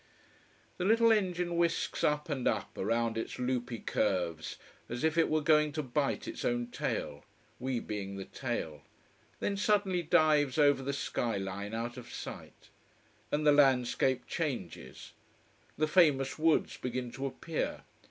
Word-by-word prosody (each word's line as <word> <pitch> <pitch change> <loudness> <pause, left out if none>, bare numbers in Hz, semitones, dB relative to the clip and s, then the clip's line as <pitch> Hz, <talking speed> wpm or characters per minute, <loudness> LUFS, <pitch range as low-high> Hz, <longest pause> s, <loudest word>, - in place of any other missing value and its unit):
The 180 - -2
little 230 +3 +5
engine 180 -5 +1
whisks 170 -1 0
up 150 0 +1
and 140 -5 -1
up, - - -1
around 115 +2 0
its - - -5
loopy 125 -1 -2
curves 90 -8 -1 0.3
as 120 +4 -4
if 160 0 +2
it 165 -1 +3
were 155 0 +2
going 150 0 +4
to 155 0 -2
bite 140 +2 -1
its - - -5
own 120 0 -1
tail: 75 -9 -3 0.4
we 130 -1 -1
being 100 -3 -5
the 95 -1 -6
tail: 80 - -4 0.6
then 200 - 0
suddenly 200 -3 +2
dives 150 -4 +3
over 145 -2 +4
the 135 +1 -2
sky 120 -5 -2
line 100 +2 -4
out 120 +2 -4
of 125 -1 -9
sight. - - -9 0.6
And 150 +1 0
the 150 - +7
landscape 130 -2 +3
changes. 130 - -5 0.6
The 155 - +2
famous 150 -5 +3
woods 160 0 +2
begin 125 -1 -4
to 135 +3 -3
appear. 160 +4 -4
135 Hz, 150 wpm, -31 LUFS, 120-155 Hz, 0.6 s, the